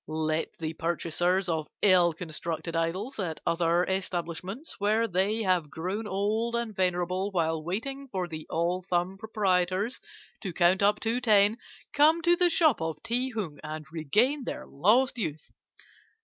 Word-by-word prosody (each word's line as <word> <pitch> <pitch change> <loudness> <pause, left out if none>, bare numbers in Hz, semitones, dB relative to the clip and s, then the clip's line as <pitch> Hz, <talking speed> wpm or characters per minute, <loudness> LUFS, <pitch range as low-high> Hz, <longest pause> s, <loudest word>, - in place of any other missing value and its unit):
"Let 155 +1 -1
the 160 -1 -4
purchasers 175 +3 0
of 160 -3 -1 0.2
ill 180 -3 +6
constructed 165 0 -5
idols 185 +10 -2
at 165 -5 -3
other 170 +1 +2
establishments, 190 - -4
where 215 +3 +2
they 205 +4 0
have 180 -6 +1
grown 190 +8 -4
old 215 +4 0
and 235 -3 -3
venerable 185 +1 0
while 160 -4 0
waiting 270 - -4
for 185 -7 -3
the 155 -2 -8
all 170 +3 0
thumb 180 +1 -1
proprietors 195 0 0 0.4
to 190 -4 -4
count 175 +3 +3
up 205 +1 +3
to 230 +2 0
ten, 215 -1 +4 0.3
come 315 +3 +4
to 345 +1 +5
the 355 0 +3
shop 315 - +3
of 160 -2 -4
Ti 245 +3 0
Hung 190 - -5
and 155 0 -6
regain 215 - +1
their - - -5
lost 235 - +2
youth. 155 -7 -4
185 Hz, 150 wpm, -28 LUFS, 165-220 Hz, 0.4 s, ill